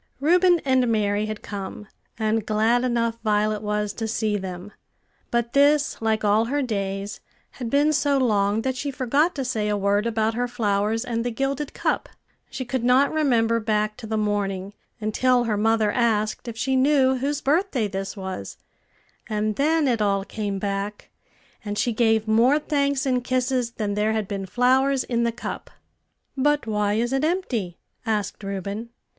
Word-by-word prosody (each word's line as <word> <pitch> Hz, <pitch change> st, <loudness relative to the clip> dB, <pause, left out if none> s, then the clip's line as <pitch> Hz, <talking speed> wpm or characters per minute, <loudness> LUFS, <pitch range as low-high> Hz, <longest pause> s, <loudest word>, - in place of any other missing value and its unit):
Reuben 350 Hz, +4 st, +4 dB
and 260 Hz, -2 st, +3 dB
Mary 210 Hz, -1 st, +1 dB
had 215 Hz, -1 st, -6 dB
come; 200 Hz, 0 st, -6 dB, 0.3 s
and 220 Hz, 0 st, 0 dB
glad 220 Hz, +3 st, +2 dB
enough 230 Hz, -2 st, 0 dB
Violet 210 Hz, -1 st, +1 dB
was 210 Hz, -1 st, -2 dB
to 225 Hz, +1 st, -4 dB
see 215 Hz, -1 st, -1 dB
them; 190 Hz, 0 st, -6 dB, 0.6 s
but 235 Hz, 0 st, -1 dB
this, 285 Hz, -1 st, +3 dB
like 220 Hz, -1 st, 0 dB
all 210 Hz, +2 st, +3 dB
her 285 Hz, +4 st, -1 dB
days, 200 Hz, -3 st, -3 dB, 0.4 s
had 240 Hz, -3 st, -3 dB
been 290 Hz, +4 st, +3 dB
so 285 Hz, 0 st, +2 dB
long 215 Hz, -4 st, +1 dB
that 260 Hz, -1 st, -1 dB
she 285 Hz, +3 st, -3 dB
forgot 275 Hz, +6 st, +1 dB
to 270 Hz, -3 st, -3 dB
say 220 Hz, -4 st, -1 dB
a 210 Hz, -, +1 dB
word 200 Hz, +2 st, +1 dB
about 220 Hz, -1 st, 0 dB
her 245 Hz, +2 st, -1 dB
flowers 220 Hz, -1 st, 0 dB
and 230 Hz, -1 st, -2 dB
the 245 Hz, -, -1 dB
gilded 275 Hz, +4 st, -3 dB
cup; -, -, -1 dB, 0.4 s
she 260 Hz, -, -5 dB
could 245 Hz, 0 st, -2 dB
not 255 Hz, +4 st, +4 dB
remember 235 Hz, -7 st, +2 dB
back 215 Hz, -1 st, 0 dB
to 235 Hz, -3 st, -8 dB
the 220 Hz, 0 st, -1 dB
morning, 200 Hz, -2 st, -1 dB, 0.3 s
until 245 Hz, +3 st, +2 dB
her 225 Hz, -3 st, 0 dB
mother 220 Hz, 0 st, +2 dB
asked 215 Hz, -1 st, 0 dB
if 230 Hz, -1 st, -6 dB
she 265 Hz, +3 st, 0 dB
knew 265 Hz, -1 st, +3 dB
whose 280 Hz, +3 st, -1 dB
birthday 295 Hz, -, +1 dB
this 195 Hz, +1 st, -5 dB
was; 190 Hz, -, -6 dB, 0.7 s
and 215 Hz, 0 st, -1 dB
then 305 Hz, +3 st, +2 dB
it 235 Hz, -4 st, +1 dB
all 200 Hz, -1 st, +1 dB
came 205 Hz, -2 st, -3 dB
back, 200 Hz, +1 st, -4 dB, 0.5 s
and 205 Hz, -1 st, -4 dB
she 240 Hz, -, +1 dB
gave 220 Hz, -1 st, +2 dB
more 235 Hz, +6 st, +4 dB
thanks 280 Hz, -2 st, 0 dB
and 250 Hz, -2 st, +1 dB
kisses 255 Hz, -1 st, 0 dB
than 210 Hz, -3 st, -2 dB
there 210 Hz, +2 st, +1 dB
had 215 Hz, -3 st, -1 dB
been 195 Hz, -2 st, -4 dB
flowers 260 Hz, +4 st, +2 dB
in 235 Hz, -1 st, 0 dB
the 235 Hz, -, +1 dB
cup. 235 Hz, -, -6 dB, 0.7 s
"But 295 Hz, +1 st, +1 dB
why 210 Hz, -2 st, 0 dB
is 240 Hz, +3 st, 0 dB
it 270 Hz, +2 st, +1 dB
empty?" 255 Hz, -, -1 dB, 0.3 s
asked 215 Hz, -3 st, -2 dB
Reuben. 200 Hz, +3 st, -4 dB
225 Hz, 175 wpm, -24 LUFS, 210-260 Hz, 0.7 s, Reuben